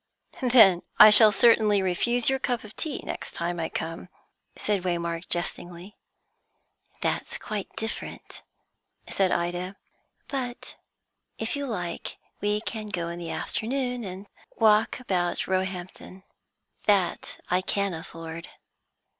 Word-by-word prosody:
"Then 225 Hz, -9 st, +6 dB, 0.2 s
I 215 Hz, 0 st, +10 dB
shall 210 Hz, +1 st, +10 dB
certainly 215 Hz, -1 st, +4 dB
refuse 235 Hz, +6 st, 0 dB
your 265 Hz, 0 st, +2 dB
cup 245 Hz, -3 st, -2 dB
of 215 Hz, 0 st, -12 dB
tea 310 Hz, -4 st, -4 dB
next -, -, -5 dB
time 170 Hz, +1 st, -2 dB
I 160 Hz, -, -2 dB
come," 165 Hz, +3 st, -5 dB, 0.5 s
said 205 Hz, -3 st, -1 dB
Waymark 170 Hz, -1 st, -3 dB
jestingly. 175 Hz, +2 st, -4 dB, 1.1 s
"That's -, -, -2 dB
quite 210 Hz, -2 st, -5 dB
different," 225 Hz, +1 st, -6 dB, 0.7 s
said 190 Hz, -2 st, +1 dB
Ida. 175 Hz, +2 st, -2 dB, 0.5 s
"But 250 Hz, -3 st, -5 dB, 0.6 s
if 225 Hz, +4 st, -2 dB
you 285 Hz, 0 st, -3 dB
like, 180 Hz, -8 st, -5 dB, 0.2 s
we 210 Hz, +1 st, 0 dB
can 220 Hz, -1 st, -5 dB
go 175 Hz, -4 st, -3 dB
in 170 Hz, 0 st, -6 dB
the 170 Hz, -1 st, -6 dB
afternoon, 250 Hz, +1 st, -2 dB
and 190 Hz, 0 st, -7 dB, 0.3 s
walk 215 Hz, +1 st, +3 dB
about 180 Hz, -8 st, -1 dB
Roehampton; 185 Hz, 0 st, -4 dB, 0.6 s
that 200 Hz, -4 st, +1 dB
I 180 Hz, +1 st, +3 dB
can 200 Hz, 0 st, -1 dB
afford." 165 Hz, 0 st, -8 dB
195 Hz, 120 wpm, -26 LUFS, 175-225 Hz, 1.1 s, I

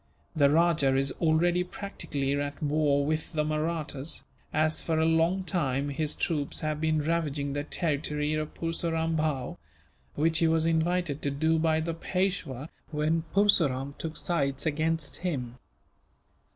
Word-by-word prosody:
The 145 Hz, -3 st, +5 dB
rajah 155 Hz, -4 st, +3 dB
is 135 Hz, 0 st, +1 dB
already 170 Hz, +2 st, +3 dB
practically 145 Hz, -8 st, -3 dB
at 145 Hz, +2 st, -3 dB
war 145 Hz, -1 st, +2 dB
with 155 Hz, +2 st, -2 dB
the 155 Hz, -1 st, +1 dB
Mahrattas 155 Hz, -1 st, -2 dB, 0.3 s
as, 155 Hz, 0 st, +1 dB
for 160 Hz, -1 st, -1 dB
a 160 Hz, -, +3 dB
long 165 Hz, +4 st, +2 dB
time, 145 Hz, -7 st, 0 dB
his 150 Hz, +2 st, -2 dB
troops 150 Hz, -4 st, -1 dB
have 155 Hz, 0 st, -2 dB
been 155 Hz, -1 st, +1 dB
ravaging 145 Hz, -3 st, -1 dB
the 145 Hz, 0 st, -2 dB
territory 150 Hz, -1 st, -1 dB
of 155 Hz, 0 st, -2 dB
Purseram 165 Hz, -1 st, -1 dB
Bhow; 150 Hz, -5 st, -1 dB, 0.6 s
which 160 Hz, +2 st, +3 dB
he 165 Hz, -, +4 dB
was 160 Hz, 0 st, +2 dB
invited 165 Hz, -2 st, +1 dB
to 140 Hz, -, 0 dB
do 160 Hz, +3 st, +1 dB
by 160 Hz, 0 st, +2 dB
the 165 Hz, +1 st, -2 dB
Peishwa, 165 Hz, -5 st, -2 dB, 0.2 s
when 160 Hz, +2 st, 0 dB
Purseram 145 Hz, -10 st, +3 dB
took 160 Hz, -1 st, -5 dB
sides 140 Hz, -5 st, -1 dB
against 160 Hz, 0 st, 0 dB
him. 130 Hz, -9 st, -3 dB
155 Hz, 145 wpm, -28 LUFS, 145-165 Hz, 0.6 s, The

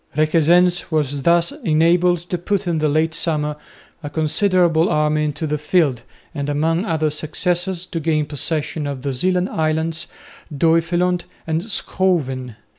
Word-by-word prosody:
Requesens 170 Hz, +3 st, +3 dB
was 145 Hz, -3 st, 0 dB
thus 170 Hz, -, +3 dB
enabled 170 Hz, +1 st, +3 dB
to 180 Hz, -, -1 dB
put 200 Hz, +2 st, -1 dB
in 170 Hz, -3 st, 0 dB
the 155 Hz, 0 st, +1 dB
late 160 Hz, +2 st, +1 dB
summer 150 Hz, -3 st, -1 dB, 0.5 s
a 145 Hz, -, -6 dB
considerable 165 Hz, +2 st, +2 dB
army 150 Hz, 0 st, +1 dB
into 150 Hz, +1 st, -3 dB
the 150 Hz, 0 st, -2 dB
field 150 Hz, -5 st, +1 dB, 0.3 s
and 145 Hz, -2 st, -3 dB
among 165 Hz, +6 st, 0 dB
other 155 Hz, -5 st, 0 dB
successes 175 Hz, +4 st, -2 dB
to 170 Hz, -, -4 dB
gain 155 Hz, -1 st, 0 dB
possession 150 Hz, +1 st, -2 dB
of 135 Hz, -2 st, -5 dB
the 140 Hz, -1 st, -2 dB
Zeeland 180 Hz, +7 st, 0 dB
islands, 160 Hz, +1 st, -1 dB, 0.4 s
Duiveland 170 Hz, +4 st, +1 dB, 0.2 s
and 160 Hz, 0 st, -1 dB
Schouwen. 135 Hz, -, -1 dB
160 Hz, 140 wpm, -20 LUFS, 150-175 Hz, 0.5 s, Requesens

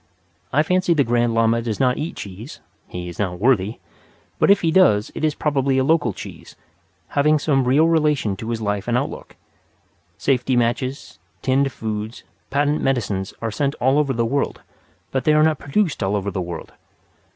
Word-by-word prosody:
I 150 Hz, -, +3 dB
fancy 180 Hz, 0 st, +2 dB
the 145 Hz, -, +4 dB
Grand 120 Hz, -1 st, +1 dB
Lama 115 Hz, 0 st, +3 dB
does 115 Hz, -2 st, -3 dB
not 125 Hz, -2 st, +2 dB
eat 155 Hz, +3 st, -4 dB
cheese 100 Hz, +7 st, -9 dB, 0.3 s
(he 90 Hz, 0 st, -6 dB
is 85 Hz, -, -9 dB
not 90 Hz, -3 st, -1 dB
worthy), 110 Hz, -2 st, +2 dB, 0.6 s
but -, -, +3 dB
if 200 Hz, 0 st, +5 dB
he 165 Hz, -, +1 dB
does 135 Hz, -, +4 dB
it -, -, -6 dB
is 155 Hz, -1 st, +1 dB
probably 140 Hz, -3 st, 0 dB
a 130 Hz, -, +3 dB
local 145 Hz, -4 st, +2 dB
cheese, -, -, -10 dB, 0.5 s
having 150 Hz, +2 st, +3 dB
some 140 Hz, -3 st, +1 dB
real 145 Hz, +6 st, +4 dB
relation 150 Hz, -10 st, +1 dB
to 110 Hz, +3 st, -6 dB
his 115 Hz, -1 st, -2 dB
life 105 Hz, 0 st, -2 dB
and 120 Hz, 0 st, +2 dB
outlook. -, -, -5 dB, 0.8 s
Safety 130 Hz, -1 st, +1 dB
matches, 125 Hz, +3 st, -1 dB, 0.2 s
tinned 135 Hz, +1 st, +2 dB
foods, 110 Hz, 0 st, -5 dB, 0.3 s
patent 145 Hz, +2 st, +1 dB
medicines 105 Hz, -8 st, -1 dB
are 115 Hz, -, -1 dB
sent 140 Hz, +5 st, -1 dB
all 130 Hz, +4 st, +2 dB
over 145 Hz, -2 st, +1 dB
the 115 Hz, -1 st, 0 dB
world; 140 Hz, +5 st, -2 dB, 0.5 s
but 130 Hz, -, -1 dB
they 155 Hz, -, +3 dB
are 155 Hz, 0 st, +5 dB
not 155 Hz, -2 st, +2 dB
produced 165 Hz, +3 st, 0 dB
all 95 Hz, +2 st, 0 dB
over 100 Hz, 0 st, -2 dB
the 95 Hz, -, -3 dB
world. 85 Hz, -2 st, -6 dB
130 Hz, 185 wpm, -21 LUFS, 110-150 Hz, 0.8 s, if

